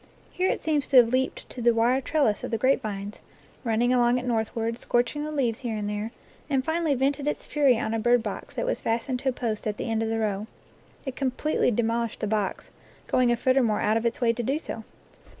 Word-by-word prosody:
Here 370 +1 0
it - - -2
seems 300 -3 +1
to 270 - +4
have 240 -2 +8
leaped 260 +2 -1
to 250 - -7
the 235 0 +4
wire 240 +4 +3
trellis 270 -7 +1
of - - -3
the 225 - 0
grapevines, 210 -5 -1 0.4
running 240 +1 +2
along 245 0 +3
it 250 - -3
northward, 230 0 -1
scorching 245 +5 0
the 305 - -4
leaves 250 -7 0
here 230 -4 -3
and 205 -1 -3
there, 210 +1 -3 0.4
and 265 -3 +1
finally 320 -2 +1
vented 275 +2 0
its 295 - -2
fury 280 -5 +3
on 220 -1 -2
a 225 - 0
bird 240 +1 +3
box 210 -3 -6
that - - -1
was - - -1
fastened 235 +3 -1
to 265 - 0
a - - +1
post 225 -4 -3
at 210 -1 -2
the 230 - -3
end 225 0 0
of 225 - -1
the 225 - 0
row. 210 -1 -1 0.6
It 265 -2 -4
com 270 -2 0
pletely 255 -3 0
demolished 230 0 -1
the - - 0
box, 210 -2 -2 0.3
going 250 -1 +2
a - - +3
foot 260 +2 +2
or - - +6
more 220 -4 +1
out 215 - +2
of 230 +1 +1
its 230 - -3
way 230 -2 +3
to 240 - -3
do 270 +5 0
so. 230 -8 -7
240 Hz, 240 wpm, -26 LUFS, 225-265 Hz, 0.6 s, have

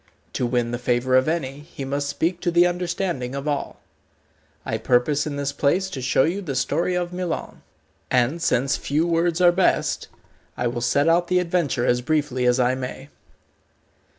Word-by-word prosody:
To 125 - 0
win 120 -1 0
the 120 - -3
favour 125 +1 +1
of 130 +2 +4
any, 145 -4 -2
he 145 -2 -8
must 140 +1 -2
speak 170 +2 -1
to 175 - 0
the 175 +1 +5
understanding 175 -7 -2
of 140 +2 -4
all. 145 -2 -3 0.9
I 110 - -2
purpose 130 +6 +2
in 145 - -4
this 140 0 -2
place 175 +7 0
to 135 - -5
show 130 +1 +3
you 185 +5 -1
the 145 -8 -4
story 165 +7 0
of 175 0 -2
Milon, 180 -2 -4 0.5
and 130 +7 +1
since 130 -1 +1
few 150 +4 0
words 170 0 +1
are 175 -1 +7
best 185 +1 +1 0.5
I 125 - -1
will 120 0 -2
set 140 +5 +2
out 170 +1 +3
the 180 - +2
adventure 170 -8 0
as 125 0 +2
briefly 135 -3 0
as 125 +1 +3
I 125 0 +3
may. 130 +2 -6
145 Hz, 180 wpm, -23 LUFS, 125-170 Hz, 0.9 s, are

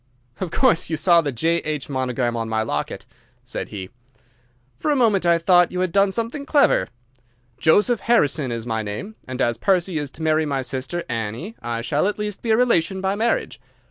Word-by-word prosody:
"Of 185 - -3
course 200 -2 +2
you 160 - -1
saw 170 +1 +5
the 145 -3 -2
'J.H.' 155 +2 -1
monogram 125 -3 -1
on 115 -1 -3
my 110 0 0
locket," 75 -8 -4 0.4
said - - -6
he. 95 -2 -7 0.9
"For - - -1
a 295 - +3
moment 215 -8 +2
I 170 0 +5
thought 175 +1 +4
you 180 - -2
had 185 -2 0
done 195 +1 +3
something 230 +7 -3
clever. 280 - +3 0.7
Joseph 205 - +3
Harrison 150 - +1
is 115 -1 -4
my 110 -2 -2
name, 110 - -6
and 130 0 -6
as 120 -2 +1
Percy 180 -2 +1
is 145 -2 -4
to 160 - -6
marry 155 0 +2
my 135 -2 -1
sister 135 +7 -3
Annie 115 - -4
I 115 -1 -3
shall 145 +9 +1
at 205 - -2
least 210 -2 -4
be 235 - -4
a 220 - +4
relation 190 -7 +2
by 190 +1 0
marriage. 225 +3 -1
165 Hz, 195 wpm, -22 LUFS, 125-195 Hz, 0.9 s, saw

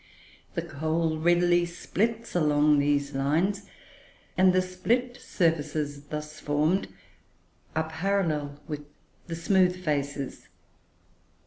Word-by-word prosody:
The 170 - -1
coal 160 0 -1
readily 175 +1 +4
splits 220 +6 -2
along 150 -3 +4
these 145 0 +1
lines, 170 +9 0 0.7
and 185 0 +5
the 185 - +3
split 240 +7 -1
surfaces 150 -4 -1
thus 150 +1 -6
formed 155 +6 +1 0.9
are 160 0 0
parallel 160 -4 -1
with 150 -2 -5 0.4
the 165 - -4
smooth 180 +1 +3
faces. 140 -2 -2
160 Hz, 100 wpm, -27 LUFS, 145-180 Hz, 0.9 s, and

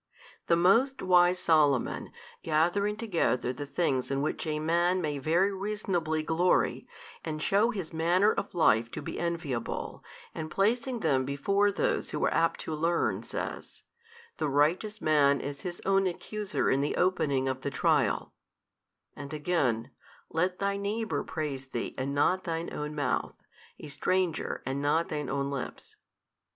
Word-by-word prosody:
The 170 - +4
most 230 +11 +3
wise 180 -1 +5
Solomon, 150 -7 +2 0.3
gathering 175 +7 +1
together 170 - 0
the 145 +3 -6
things 140 -5 0
in 135 0 0
which 155 - -2
a 155 -1 -1
man 170 +4 +2
may 150 -4 -2
very 175 +8 +2
reasonably 190 -6 -2
glory, 165 +3 +2 0.4
and 155 -2 -4
shew 200 +8 +3
his 190 -10 -5
manner 175 +6 +3
of - - -4
life 115 -8 +3
to - - -4
be - - -5
enviable, 165 -9 -3 0.3
and 155 -1 -5
placing 230 +7 0
them 130 -1 +2
before 195 +10 +1
those - - -1
who - - -1
are - - +1
apt 165 - +1
to 160 - -4
learn, 165 +2 0
says, - - -6 0.5
The 150 - -1
righteous 170 +10 +1
man 140 -2 +4
is 140 +1 -6
his 175 -1 -6
own 195 0 +3
accuser 205 +3 -3
in 135 - +2
the 145 - -1
opening 140 -7 +1
of 130 0 -2
the 140 - -2
trial, - - +1 0.8
and 140 -1 -8
again, 145 -8 0 0.4
Let 180 +3 0
thy 200 0 -1
neighbour 210 +3 -2
praise 145 -4 -4
thee 120 -3 -4
and 135 +2 -3
not 185 +6 +2
thine 165 -1 -3
own 150 0 -4
mouth, 145 -4 -1 0.4
a - - -8
stranger 175 +4 -1
and 135 +1 -2
not 150 +3 +1
thine 150 -3 -3
own 140 0 -1
lips. 140 -3 -6
165 Hz, 155 wpm, -29 LUFS, 145-185 Hz, 0.8 s, wise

